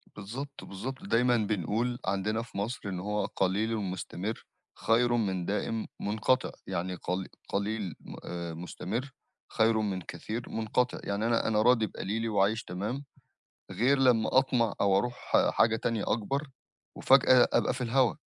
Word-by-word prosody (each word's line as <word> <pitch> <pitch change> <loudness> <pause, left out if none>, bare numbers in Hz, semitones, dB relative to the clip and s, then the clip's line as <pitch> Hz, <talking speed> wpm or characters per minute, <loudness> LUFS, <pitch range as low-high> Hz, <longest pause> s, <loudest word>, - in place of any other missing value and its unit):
بالضبط، 130 +8 -7
بالضبط. 130 - -6
دايمًا 125 -8 +3
بنقول 110 +4 -1
عندنا 100 +4 0
في 115 -4 -10
مصر 110 +5 -2
إن 90 -1 -3
هو 105 +2 -1
"قليلٌ 105 +4 0
مستمر 95 +2 -4 0.4
خيرٌ 120 +2 +3
من 95 -6 0
دائم 110 +2 -2
منقطِع." 110 +5 +1 0.2
يعني 90 +2 -2
قلي 90 +2 -3 0.2
قليل 100 -3 -2
م - - -10
آآ 85 -1 -5
مستمر 100 +10 -4 0.4
خير 110 -1 +3
من 95 -3 -2
كثير 110 +7 -6
منقطِع. 115 +3 0
يعني 100 +2 -1
أنا 115 -1 +2
أنا 110 -1 +2
راضي 115 -2 +4
بقليلي 110 +5 -3
وعايش 105 +2 +2
تمام، 105 +10 -4 0.7
غير 135 +4 +2
لما 125 -1 +4
أطمَع 120 -5 +3
أو 100 -1 +4
أرُوح 120 +4 -3 0.2
حاجة 110 0 +3
تانية 115 -1 -1
أكبر 135 +7 -1 0.5
وفجأة 130 -2 +6
أبقى - - +3
في 130 - -6
الهوا. 125 +1 +2
110 Hz, 145 wpm, -29 LUFS, 100-120 Hz, 0.7 s, وفجأة